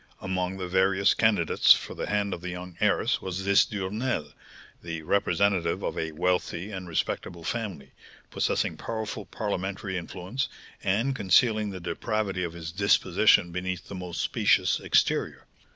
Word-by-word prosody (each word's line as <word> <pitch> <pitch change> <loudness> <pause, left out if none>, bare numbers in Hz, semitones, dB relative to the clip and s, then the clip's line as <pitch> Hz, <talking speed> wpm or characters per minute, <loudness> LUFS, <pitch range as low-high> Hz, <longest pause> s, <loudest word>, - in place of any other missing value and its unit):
Among 95 0 -2
the 90 -1 -4
various 95 +2 +3
candidates 105 -8 +5
for - - -5
the - - -4
hand 100 -1 0
of 85 - -6
the 90 - -5
young 90 0 -7
heiress - - +2
was 95 +1 -4
this 100 0 +5
Duresnel, 100 - -3 0.5
the 85 -2 -6
representative 95 -1 +1
of - - -2
a 80 0 -2
wealthy 90 +3 -1
and 95 -2 -6
respectable 85 +1 -3
family, 95 - -4 0.4
possessing - - 0
powerful 110 -2 -4
parliamentary 100 -2 -3
influence, 95 +9 -4 0.3
and 110 +8 +1
concealing 105 +1 +3
the 95 -2 -6
depravity 95 +2 -2
of 85 -2 -4
his 80 -2 -6
disposition 90 -2 +3
beneath 90 +1 -4
the - - -7
most 90 -3 -4
specious - - +2
exterior. - - +1
95 Hz, 145 wpm, -27 LUFS, 90-100 Hz, 0.5 s, candidates